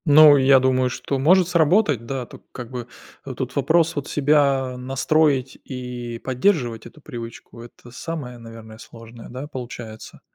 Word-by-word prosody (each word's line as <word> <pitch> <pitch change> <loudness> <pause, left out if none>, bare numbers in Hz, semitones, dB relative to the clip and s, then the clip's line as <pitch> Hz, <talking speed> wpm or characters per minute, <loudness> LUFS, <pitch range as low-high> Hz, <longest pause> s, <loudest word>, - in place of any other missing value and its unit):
Ну, 150 -1 +8
я 135 0 +5
думаю, 130 -1 +2
что 135 +2 -3
может 175 +6 +4
сработать, 160 - +2
да. 130 -1 -4
Тут, - - -15
как 125 -2 -9
бы, 120 -2 -6 0.4
тут 130 -2 -6
вопрос 160 +4 +2
себя 140 -3 +2
настроить 135 +1 0
и 125 -2 -6
поддерживать 125 - 0
эту 150 +6 -17
привычку. 115 -3 -9
Это 120 0 -14
самое, 135 -2 -6
наверное, 115 -1 -12
сложное, 115 0 -12
да, 130 +4 -7
получается? 120 -5 -9
130 Hz, 140 wpm, -22 LUFS, 120-145 Hz, 0.4 s, Ну